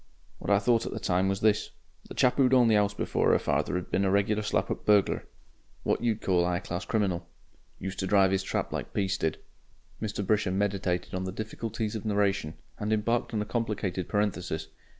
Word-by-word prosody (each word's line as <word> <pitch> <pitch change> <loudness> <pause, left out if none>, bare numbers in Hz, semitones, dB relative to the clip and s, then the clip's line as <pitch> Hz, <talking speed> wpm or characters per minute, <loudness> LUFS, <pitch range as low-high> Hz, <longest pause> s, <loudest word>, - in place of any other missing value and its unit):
What - - -5
I 100 - +6
thought 115 +2 +2
at - - -4
the - - -4
time 90 +1 +1
was 95 0 -1
this. 105 -1 +2 0.4
The - - -8
chap 125 - +3
who'd 130 -1 +5
owned 120 -3 +5
the - - +5
'ouse 100 -1 +2
before - - +2
'er - - +5
father 90 - 0
'd 90 - -10
been 95 - +2
a 95 - +2
regular 100 +2 +2
slap 105 - 0
up - - -3
burglar. 105 -2 +3 0.6
What - - 0
you'd 110 -2 0
call 90 -2 +3
a 90 0 +1
'igh 90 - -2
class 90 +1 -4
criminal. 95 -4 0 0.5
Used 95 0 -5
to 95 - -1
drive 95 -1 +4
'is 95 - +2
trap 95 - -2
like - - -5
Peace 100 -1 0
did." 80 - 0 0.6
Mr. 105 -2 -2
Brisher 105 -1 +2
meditated 95 -3 -1
on 95 0 -2
the 95 - -3
difficulties 110 +1 -4
of 110 - -4
narration 100 -6 0 0.2
and 105 +1 -2
embarked 115 +2 +1
on 105 - +1
a - - -9
complicated 105 -6 -2
parenthesis. 90 -6 -1
100 Hz, 210 wpm, -28 LUFS, 95-110 Hz, 0.6 s, I